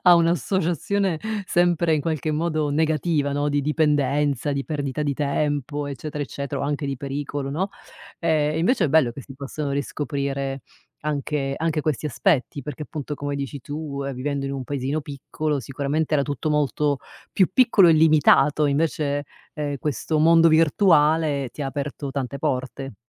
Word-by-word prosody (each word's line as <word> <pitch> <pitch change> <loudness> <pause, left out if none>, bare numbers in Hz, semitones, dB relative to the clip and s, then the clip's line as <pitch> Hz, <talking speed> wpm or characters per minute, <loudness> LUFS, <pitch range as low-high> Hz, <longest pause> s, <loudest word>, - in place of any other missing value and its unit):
ha 180 -1 +8
un’associazione 175 +1 +1 0.3
sempre 175 -2 +2
in 150 - 0
qualche 155 0 -2
modo 155 -1 0
negativa, 155 -1 +1
no, 145 +1 0
di 145 0 +1
dipendenza, 145 -2 +1
di 140 0 -2
perdita 145 -1 -3
di 145 -1 0
tempo, 145 0 -1
eccetera 145 +1 -5
eccetera, 140 0 -4
o - - -1
anche 145 0 -2
di 140 -1 -2
pericolo 140 +1 -4
no. 185 +8 -2 0.5
Ehm, 155 -2 +1
invece 190 +4 +2
è - - +2
bello 145 -4 +4
che 120 - -9
si 135 0 -11
possano 140 +1 -4
riscoprire 140 -1 -2 0.4
anche 145 -2 -2
anche 160 -1 0
questi 155 0 -1
aspetti, 145 -3 0
perché 150 +1 -6
appunto 150 -2 -5
come 145 0 -3
dici 140 0 -4
tu, 145 0 -5
ehm, 135 -1 -3
vivendo 140 +2 -2
in 135 - -3
un 135 -1 -3
paesino 140 +3 -2
piccolo, 145 +1 -3
sicuramente 140 +4 -1
era 140 - +3
tutto 145 +1 -2
molto 150 -1 +1 0.3
più 190 - +3
piccolo 225 -6 +5
e - - +7
limitato, 155 -2 +5
invece, 145 -1 0 0.3
ehm, 145 -1 -3
questo 150 +3 -1
mondo 165 +1 +6
virtuale 155 -3 +3
ti 150 - -6
ha - - -2
aperto 140 0 -4
tante 140 0 -3
porte. 130 0 -3
145 Hz, 160 wpm, -23 LUFS, 140-155 Hz, 0.5 s, ha